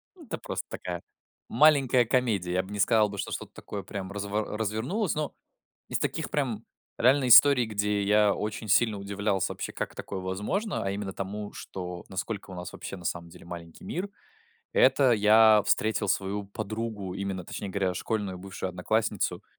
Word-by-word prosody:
Ну, 335 Hz, -, -14 dB
это -, -, -4 dB
просто -, -, -5 dB
такая -, -, -5 dB, 0.5 s
маленькая 135 Hz, -5 st, +5 dB
комедия. 110 Hz, -8 st, +1 dB
Я 95 Hz, +1 st, +1 dB
б 95 Hz, -, -11 dB
не 105 Hz, -, -5 dB
сказал 105 Hz, 0 st, +4 dB
бы, 100 Hz, -, -7 dB
что -, -, -3 dB
что-то -, -, -6 dB
такое 100 Hz, -2 st, -7 dB
прям 95 Hz, 0 st, -6 dB
разво 105 Hz, +1 st, -3 dB
развернулось. 120 Hz, -, -1 dB
Но 150 Hz, -1 st, -2 dB, 0.6 s
из -, -, 0 dB
таких, -, -, -2 dB
прям -, -, -1 dB, 0.3 s
реальной 130 Hz, +1 st, +4 dB
истории, 125 Hz, -1 st, +8 dB
где 105 Hz, -1 st, 0 dB
я 105 Hz, 0 st, +4 dB
очень 105 Hz, +1 st, -4 dB
сильно 105 Hz, +1 st, +3 dB
удивлялся 100 Hz, -1 st, -1 dB
вообще, -, -, -5 dB
как -, -, -4 dB
такое 95 Hz, -2 st, -5 dB
возможно, 105 Hz, -, -2 dB
а 95 Hz, -, -1 dB
именно 100 Hz, -1 st, -4 dB
тому, 100 Hz, +2 st, -5 dB
что, 90 Hz, -2 st, -7 dB
насколько 95 Hz, +2 st, -4 dB
у 95 Hz, -, -7 dB
нас 90 Hz, -1 st, -7 dB
вообще 95 Hz, -, -7 dB
на 90 Hz, -, -12 dB
самом 85 Hz, 0 st, -3 dB
деле -, -, -14 dB
маленький 85 Hz, -1 st, -9 dB
мир. 190 Hz, +4 st, -3 dB, 0.7 s
Это 145 Hz, -, +5 dB
я 110 Hz, 0 st, +6 dB
встретил 110 Hz, -1 st, +1 dB
свою 100 Hz, +1 st, -1 dB
подругу, 110 Hz, -2 st, -4 dB
именно, 95 Hz, -2 st, -3 dB
точнее 100 Hz, -, -5 dB
говоря, 95 Hz, -1 st, 0 dB
школьную 100 Hz, -1 st, -2 dB
бывшую 95 Hz, 0 st, -5 dB
одноклассницу, 105 Hz, +2 st, -1 dB
105 Hz, 170 wpm, -28 LUFS, 95-110 Hz, 0.7 s, истории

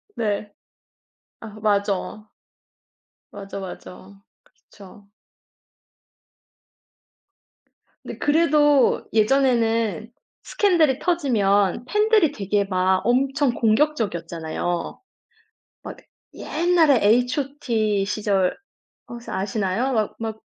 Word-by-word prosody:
네. 210 Hz, -2 st, -3 dB, 0.9 s
아 225 Hz, -, -9 dB
맞어. 205 Hz, 0 st, -2 dB, 1.0 s
맞어, 195 Hz, 0 st, -8 dB
맞어 195 Hz, +1 st, -11 dB, 0.2 s
그렇죠. 200 Hz, 0 st, -18 dB, 2.9 s
근데 -, -, -8 dB
그래도 295 Hz, -3 st, +2 dB
예전에는 230 Hz, -3 st, +1 dB, 0.3 s
스캔들이 330 Hz, -10 st, +2 dB
터지면 225 Hz, -, +1 dB
팬들이 420 Hz, -, +2 dB
되게 205 Hz, -5 st, -1 dB
막 185 Hz, -1 st, 0 dB
엄청 270 Hz, +2 st, +1 dB
공격적이었잖아요. 175 Hz, -, -2 dB, 0.8 s
막 -, -, -8 dB, 0.4 s
옛날에 325 Hz, -5 st, +2 dB
H.O.T. 240 Hz, -3 st, 0 dB
시절 195 Hz, -3 st, 0 dB, 0.5 s
혹시 240 Hz, 0 st, -9 dB
아시나요? 200 Hz, +5 st, -2 dB
막 215 Hz, -3 st, -1 dB
막 220 Hz, -1 st, -5 dB
220 Hz, 175 characters per minute, -22 LUFS, 200-275 Hz, 2.9 s, 그래도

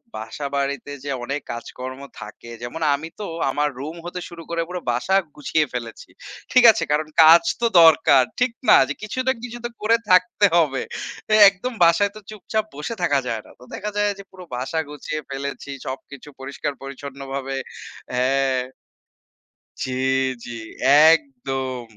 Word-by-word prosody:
বাসা-বাড়িতে 140 Hz, +4 st, -4 dB
যে, 145 Hz, -, -5 dB
অনেক 140 Hz, +4 st, -3 dB
কাজকর্ম 125 Hz, +2 st, -7 dB, 0.2 s
থাকে। 115 Hz, -, -10 dB
যেমন 140 Hz, +7 st, -6 dB
আমি 160 Hz, +3 st, -7 dB
তো 210 Hz, -, -4 dB, 0.3 s
আমার 150 Hz, +2 st, +1 dB
রুম 155 Hz, +5 st, -6 dB
হতে 175 Hz, +1 st, -5 dB
শুরু 170 Hz, -1 st, -10 dB
করে 170 Hz, 0 st, -1 dB
পুরা 180 Hz, -1 st, -5 dB
বাসা 125 Hz, +11 st, 0 dB, 0.2 s
গুছিয়ে 150 Hz, +1 st, 0 dB
ফেলেছি। 115 Hz, -2 st, -7 dB, 0.4 s
ঠিক 255 Hz, -2 st, +6 dB
আছে? -, -, -2 dB
কারণ 155 Hz, +1 st, +1 dB, 0.2 s
কাজ 165 Hz, +2 st, +8 dB, 0.2 s
তো -, -, +2 dB, 0.2 s
দরকার। 155 Hz, -4 st, +6 dB, 0.2 s
ঠিক 250 Hz, 0 st, +2 dB, 0.2 s
না? -, -, +9 dB, 0.3 s
কিছু 215 Hz, +4 st, -4 dB
না 260 Hz, -, +5 dB
কিছু 240 Hz, -1 st, -6 dB
তো -, -, -2 dB
করে 225 Hz, +2 st, +3 dB
থাকতে 205 Hz, +3 st, +4 dB
হবে। 145 Hz, -6 st, +2 dB, 0.5 s
তো -, -, -6 dB, 0.2 s
একদম 200 Hz, +7 st, -6 dB
বাসায় 170 Hz, +4 st, +4 dB
তো -, -, -8 dB
চুপচাপ 215 Hz, 0 st, -3 dB
বসে 150 Hz, +11 st, -5 dB
থাকা 145 Hz, -5 st, +3 dB
যায় 115 Hz, -2 st, -2 dB
না। -, -, -16 dB
তো 125 Hz, -, -15 dB
দেখা 210 Hz, -, -4 dB
যায় 205 Hz, 0 st, +2 dB
যে, -, -, -8 dB
পুরো 185 Hz, -1 st, -12 dB
বাসা 135 Hz, +6 st, -2 dB
গুছিয়ে 155 Hz, +1 st, -5 dB
ফেলেছি। 140 Hz, +1 st, -5 dB, 0.2 s
সবকিছু 135 Hz, +2 st, -8 dB
পরিষ্কার-পরিচ্ছন্নভাবে 135 Hz, 0 st, -6 dB, 0.6 s
হ্যাঁ। 130 Hz, +1 st, +1 dB, 1.2 s
জি, 130 Hz, -, -3 dB, 0.5 s
জি, -, -, -7 dB, 0.6 s
একদম। 135 Hz, -4 st, -2 dB
145 Hz, 150 wpm, -22 LUFS, 135-175 Hz, 1.2 s, না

